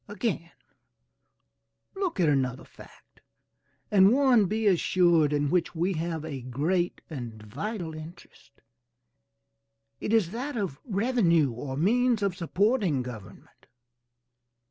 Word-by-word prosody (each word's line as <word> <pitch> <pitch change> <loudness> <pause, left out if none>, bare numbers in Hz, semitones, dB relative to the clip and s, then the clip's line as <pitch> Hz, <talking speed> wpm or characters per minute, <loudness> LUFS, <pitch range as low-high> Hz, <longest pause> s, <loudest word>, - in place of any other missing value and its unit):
Again, 200 -5 -3 1.5
look 380 - -2
at 170 - +3
another 130 -3 0
fact, - - -18 0.7
and 195 -1 +6
one, 250 -6 +4
be 220 +3 -2
assured, 175 -5 +3
in 145 -1 0
which 180 -1 0
we 175 +4 0
have 160 -1 -3
a 140 -5 -5
great 155 +9 -1
and 120 -8 -7
vital 160 - -5
interest; 155 -7 -13 1.4
it - - -3
is 215 -7 +2
that 250 +4 -4
of 190 -10 -3
revenue 195 - +2
or 130 +3 -6
means 230 - +2
of 195 -3 0
supporting 185 - +1
government. 120 -5 -11
175 Hz, 115 wpm, -27 LUFS, 145-210 Hz, 1.5 s, and